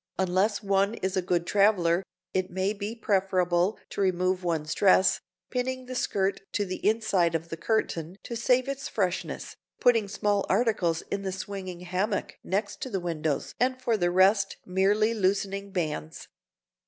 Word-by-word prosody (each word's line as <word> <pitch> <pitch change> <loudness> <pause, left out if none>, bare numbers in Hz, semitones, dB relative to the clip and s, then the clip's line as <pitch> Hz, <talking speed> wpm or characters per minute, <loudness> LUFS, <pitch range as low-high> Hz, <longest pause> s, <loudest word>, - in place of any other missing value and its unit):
Unless 190 +3 +1
one 200 +2 +2
is 190 -3 -2
a 185 - +2
good 175 -1 0
traveler, 190 -4 +3 0.3
it 185 0 0
may 190 +2 0
be 210 +2 -5
preferable 190 -3 +1
to - - -3
remove 185 0 +1
one's 160 -3 -1
dress, 190 -1 +4 0.3
pinning 255 0 -2
the 255 - -6
skirt 195 -5 0
to 205 - 0
the 185 -1 -6
inside 200 -6 +2
of 165 +1 -3
the 165 - -4
curtain 175 -5 -1
to 235 - -5
save 250 +2 +2
its 275 0 -3
freshness, 185 -4 -2 0.2
putting 230 -4 +4
small 205 0 0
articles 190 -9 +1
in 200 - -1
the 190 -1 -3
swinging 185 -2 -6
hammock 185 +4 -2
next 200 +4 -2
the 195 - 0
windows 160 -4 -2
and 255 +2 +1
for 240 -3 +1
the 175 -4 +1
rest 190 +2 +3
merely 205 +4 +2
loosening 200 -1 0
bands. 155 - -3
195 Hz, 155 wpm, -27 LUFS, 180-210 Hz, 0.3 s, dress